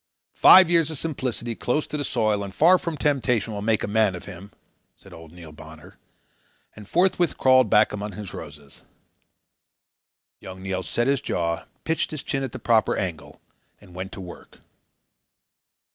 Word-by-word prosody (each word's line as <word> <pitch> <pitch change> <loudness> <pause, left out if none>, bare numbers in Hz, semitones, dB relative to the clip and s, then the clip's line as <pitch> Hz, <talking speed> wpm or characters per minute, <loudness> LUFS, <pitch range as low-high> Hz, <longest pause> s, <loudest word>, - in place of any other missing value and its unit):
"Five 185 -1 +8
years 165 -3 +2
of 160 - -6
simplicity, 130 -6 -4
close 125 +6 -2
to - - -7
the 145 - -2
soil 105 -5 0
and 100 - -7
far 175 +4 +5
from 165 -3 -5
temptation, 125 -7 0
will 100 - -5
make 110 +1 0
a - - -2
man 105 -2 +1
of 90 - -10
him," 100 0 -11 0.5
said - - -17
old 80 -1 -13
Neil 85 -2 -12
Bonner, 80 0 -14 0.8
and 105 -1 -13
forthwith 175 -2 +1
crawled 130 -3 +4
back 105 0 +3
among 105 0 -5
his 100 -1 -9
roses. 75 -2 -11 1.6
Young 95 0 -11
Neil 95 -1 -3
set 120 +5 -2
his 140 0 +1
jaw, 85 -1 -2 0.2
pitched 160 0 -1
his 155 -3 -7
chin 135 - -3
at 135 - -4
the - - -7
proper 115 -2 +1
angle, 85 -6 -5 0.4
and 90 - -18
went 95 +1 -7
to - - -8
work. 90 -2 -12
110 Hz, 170 wpm, -24 LUFS, 95-140 Hz, 1.6 s, Five